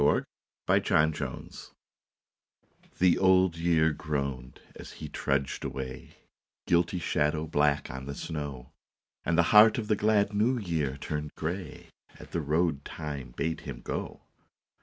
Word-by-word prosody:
BLOOD 70 +1 +3 0.4
ROAD 75 0 +1 1.5
THE 90 -2 +4
Old 95 -2 +4
Year 85 -1 +3
groaned 70 -4 -4 0.2
as - - -10
he 75 - -7
trudged 70 -2 -1
away, 65 -1 -5
His - - -21 0.5
guilty 85 +1 +2
shadow 75 -2 0
black 75 -1 +1
on 65 +1 -7
the 70 - -5
snow, 70 -5 -6 0.5
And 85 0 +1
the 85 - +6
heart 105 +3 +8
of 110 -3 -3
the 105 - +4
glad 105 0 +2
New 115 +5 +2
Year 80 - -2
turned 75 +1 -5
grey 85 +1 -5 0.3
At - - -12
the 85 - -1
road 75 -1 0
Time 70 -6 -6
bade 80 0 -1
him - - -7
go. - - -5
80 Hz, 140 wpm, -29 LUFS, 70-90 Hz, 1.5 s, heart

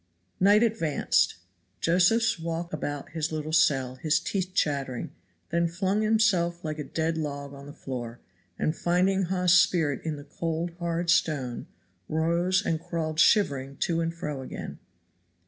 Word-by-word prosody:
Night 205 +4 +5
advanced. 210 -10 +1 0.4
Josephs 185 +5 +3
walked 165 +1 -4
about 145 -2 -4
his 160 -1 -2
little 155 0 -4
cell, 135 -5 +2
his 155 +2 +1
teeth 185 -2 -3
chattering, 135 -6 -1 0.4
then 170 0 +2
flung 190 +5 0
himself 185 -6 +2
like 155 0 -3
a - - -2
dead 160 +2 -2
log 140 -2 -4
on 140 0 -11
the - - -8
floor, 120 -4 -6 0.4
and 155 - 0
finding 185 +2 +1
Hawes's 180 0 +4
spirit 155 -6 +1
in 160 -2 -2
the 145 - -9
cold, 165 +3 -3
hard 170 0 0
stone, 135 -7 0 0.4
rose 170 +5 +1
and 160 - 0
crawled 160 -2 -3
shivering 140 -9 +3
to 165 -1 +1
and 165 0 -1
fro 150 -5 -4
again. 130 - -7
165 Hz, 145 wpm, -27 LUFS, 145-180 Hz, 0.4 s, Night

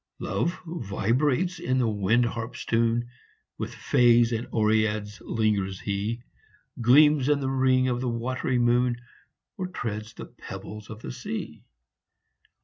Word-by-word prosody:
Love 170 - -2
vibrates 145 - 0
in 130 +1 0
the 125 -2 +2
wind 110 +3 +2
harp 115 +1 -4
s - - -7
tune 115 +1 +1 0.5
With - - -4
fays 120 -1 +4
and 115 +1 -2
oreads 110 -1 +1
lingers 100 -4 0
he 105 +4 -3 0.6
Gleams 145 +3 +5
in 145 - +4
th 135 -1 -2
ring 130 -1 +3
of 120 -1 -1
the 130 - -1
watery 125 +2 -1
moon, 120 0 +2 0.6
Or 185 -2 -3
treads 110 - -5
the - - -7
pebbles 105 0 -9
of 110 +1 -9
the - - -5
sea. 125 -3 -6
120 Hz, 140 wpm, -26 LUFS, 110-130 Hz, 0.6 s, Gleams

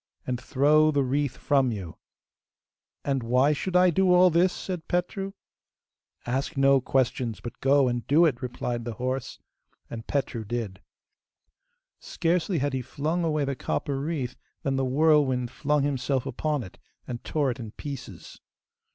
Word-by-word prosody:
and 125 -1 -3
throw 150 +4 +4
the 145 -2 +2
wreath 135 +1 -1
from 135 -4 +2
you!' 95 -7 -6 1.1
'And 135 -2 0
why 125 +5 +3
should 180 +5 -3
I 180 0 +6
do 185 +2 +3
all 180 0 +6
this?' 175 +3 +4
said 180 -4 -6
Petru. 195 +2 -2 0.9
'Ask 135 +5 -2
no 135 0 +5
questions, 125 -3 0
but 120 - -8
go 135 0 +4
and 120 -2 -2
do 160 +5 +5
it,' 135 -6 0
replied 120 -1 -3
the 120 0 -4
horse. 130 +2 -3 0.5
And 115 -1 -7
Petru 130 -5 -2
did. 105 -3 -4 1.2
Scarcely 175 +1 0
had 145 -1 -1
he 130 - -1
flung 155 +7 -2
away 155 -3 +1
the 140 0 -2
copper 135 +2 -2
wreath 140 -4 -3 0.3
than 135 -1 0
the 135 0 +1
whirlwind 130 -3 +3
flung 150 -1 0
himself 135 -2 -1
upon 150 +1 -2
it, 95 - -13 0.3
and 120 -1 -6
tore 145 -4 0
it 125 - -7
in 115 -2 -6
pieces. 140 +5 -9
135 Hz, 155 wpm, -26 LUFS, 125-155 Hz, 1.2 s, I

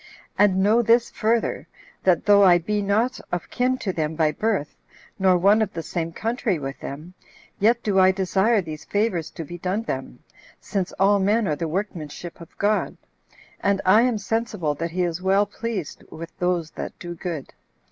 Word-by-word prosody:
And 190 -2 +3
know 220 +4 +4
this 235 +1 +3
further, 225 +1 0 0.4
that 180 -4 +3
though 205 -1 +6
I 180 -2 +7
be 205 +5 -1
not 215 +6 0
of 175 - -4
kin 255 +1 +1
to 195 -7 -3
them 160 -1 -2
by 155 -1 +2
birth, 200 -4 -1 0.4
nor 190 -1 +4
one 200 +5 +4
of 210 -3 0
the 165 - -4
same 165 0 -3
country 225 0 -1
with 135 -2 -6
them, 155 +6 -8 0.5
yet 230 +4 +3
do 200 -4 +2
I 185 0 +6
desire 195 +3 +2
these 155 -2 -7
favors 205 -6 -1
to 165 - -7
be 175 +4 -8
done 190 +6 -1
them, 135 - -5 0.4
since 190 -3 -3
all 200 +1 +3
men 205 +2 +2
are 150 - 0
the 165 +2 -3
workmanship 175 -2 -5
of 165 - -14
God; 210 +1 0 0.6
and 200 -1 +1
I 200 +4 +6
am 245 -2 +2
sensible 210 -7 -1
that 165 +4 -4
he 180 +2 -1
is 175 0 -2
well 195 +2 +3
pleased 205 -5 -5
with 165 +1 -9
those 175 -3 0
that - - -7
do 175 -1 -7
good. 165 -5 -6
190 Hz, 185 wpm, -23 LUFS, 170-210 Hz, 0.6 s, I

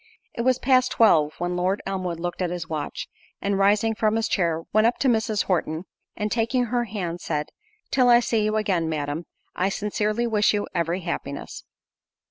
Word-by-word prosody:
It - - -3
was 255 +1 +3
past 255 0 +3
twelve, 155 -9 +4
when 175 0 -2
Lord 185 +3 0
Elmwood 185 -3 -3
looked 175 +2 -4
at 180 - 0
his 175 -2 -4
watch, 155 -2 -4 0.3
and 200 0 -1
rising 210 +3 +3
from 215 0 +1
his 225 0 +1
chair, 165 -3 0
went 215 +1 +5
up 240 - 0
to 275 - +1
Mrs. 220 -3 +1
Horton, 165 -3 -1 0.3
and 210 0 -2
taking 240 +2 +1
her 240 +1 0
hand, 180 -5 -4
said, 150 0 -2 0.4
"Till 255 -2 +4
I 240 0 +8
see 230 -2 0
you 215 0 0
again, 190 -6 0
Madam, 150 +1 -3 0.3
I 185 +2 +1
sincerely 210 +3 -1
wish 210 -2 +2
you 205 - -1
every 170 +1 -1
happiness." 140 -5 -5
200 Hz, 185 wpm, -24 LUFS, 170-225 Hz, 0.4 s, I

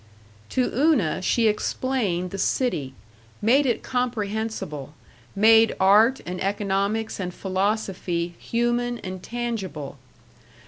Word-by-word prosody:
To 255 - +1
Una 255 - +2
she 225 +4 +2
explained 210 -5 -1
the 195 - -5
city, 155 - 0 0.4
made 265 +6 +3
it 240 - 0
comprehensible, 220 - -3 0.4
made 225 +2 +5
art 215 +7 +5
and 180 +1 -5
economics 200 +2 -1
and 180 -2 -3
philosophy 185 -3 -2
human 240 +1 0
and 185 -1 -6
tangible. 195 - -5
210 Hz, 100 wpm, -24 LUFS, 185-240 Hz, 0.4 s, made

